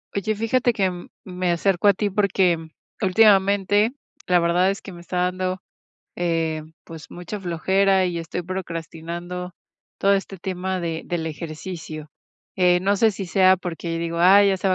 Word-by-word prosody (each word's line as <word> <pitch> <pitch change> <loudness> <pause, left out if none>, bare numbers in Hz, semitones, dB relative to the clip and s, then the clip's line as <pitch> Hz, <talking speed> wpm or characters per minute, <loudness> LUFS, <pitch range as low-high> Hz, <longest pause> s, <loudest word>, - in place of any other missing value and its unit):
Oye, 215 +2 -1
fíjate 240 +3 +1
que, 195 -3 +1
mm, 175 -1 -9 0.2
me 180 -1 -2
acerco 185 +2 +1
a 200 - +6
ti 205 +2 -1
porque, 190 -3 +2
mm, 160 0 -11 0.3
últimamente, 200 +1 +4 0.3
la 180 -1 +3
verdad 175 +2 +2
es 195 - -6
que 195 - -10
me 170 - -11
está 180 +1 -5
dando, 185 0 -2 0.5
eh, 165 -2 -1 0.2
pues 160 -2 -11
mucha 180 +4 -7
flojera 190 +2 +2
y 175 -2 -2
estoy 165 +2 -5
procrastinando 175 0 -6 0.4
todo 200 0 +3
este 195 0 -2
tema 185 +1 -3
de 165 -2 -3
del 175 -2 -3
ejercicio, 155 -1 -7 0.5
eh, 180 -1 +4
no 200 +2 +2
sé 220 +2 +4
si 195 -1 -6
sea 185 +1 +4
porque 170 -2 -4
digo: 170 0 -3
"Ay, 200 +3 +6
ya 190 - +1
se 190 - -1
va 185 - +3
180 Hz, 170 wpm, -23 LUFS, 170-195 Hz, 0.5 s, a